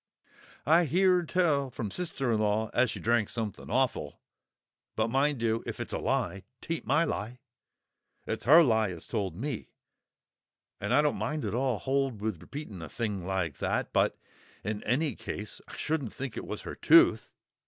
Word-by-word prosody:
"I 165 +5 +5
heeard 180 +1 +3
tell 150 -7 +2
from 110 -4 -5
her - - -5
sist'r 145 -9 -1
'n 110 - +1
law 110 +1 +1
as 125 0 +3
she - - -4
drank 115 -2 +2
somethin' 110 -3 -4
awful; 130 +2 0 0.8
but, 110 +1 +1
mind 135 -1 +1
you, 115 0 +1
if - - -5
it's - - -4
a - - -1
lie, 95 +2 -1 0.2
'taint 165 -1 -4
my 150 +5 +4
lie; 120 -6 -3 0.9
it's - - -4
her 160 +6 +9
lie 110 -6 +2
as 85 -3 -7
told 100 -7 -2
me. 125 +3 -4 1.1
And 105 - -3
I 145 +4 +5
don't 150 - 0
at 150 -5 -2
all 125 -1 +1
hold 135 0 -1
with 105 -5 -3
repeating 140 - -8
a 80 - -7
thing 105 -6 -3
like 95 -6 -1
that. - - -1
But - - +2 0.5
in 105 +1 -3
any 140 +6 +1
case, 105 0 -6
I - - -10
shouldn't 150 -7 -2
think 135 -3 -5
it - - -6
was - - -5
her - - -6
tooth! - - +5
120 Hz, 175 wpm, -29 LUFS, 105-145 Hz, 1.1 s, her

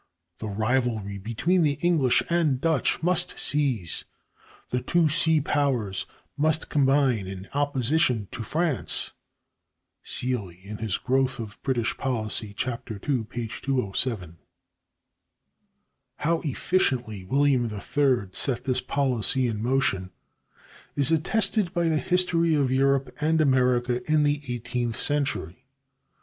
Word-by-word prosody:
The 110 - -5
rivalry 110 -1 -1
between 115 - 0
the 150 -3 +3
English 155 -8 +3
and 165 -6 +1
Dutch 160 -1 0
must 180 0 +1
cease; 130 - +1 0.7
the 125 - 0
two 165 +6 +2
sea 160 0 +3
powers 130 -10 -1 0.3
must 155 +2 0
combine 135 -7 +2
in 95 0 -7
opposition 135 -5 +1
to 120 - -6
France" 155 +4 -1 0.9
(Seeley, 105 -5 -2 0.3
"Growth 130 0 +1
of 110 -3 -8
British 120 -4 -1
Policy," 110 -4 0 0.2
II, 120 +1 -3
p. 120 -1 -4
207). 110 - -2 1.8
How 165 +2 0
efficiently 125 - -1
William 135 +4 +2
III 120 0 0
set 125 +5 +2
this 130 -2 0
policy 130 -2 +1
in 110 -3 -2
motion 115 -7 0 0.9
is 145 +2 +3
attested 190 +3 +1
by 170 -1 +1
the 155 -1 +1
history 170 -2 +1
of 140 -3 +1
Europe 135 +1 +1
and 160 +1 +2
America 125 -3 +2
in 155 -1 +4
the 145 0 +1
eighteenth 120 0 -3
century. 130 - -1
130 Hz, 110 wpm, -25 LUFS, 115-150 Hz, 1.8 s, in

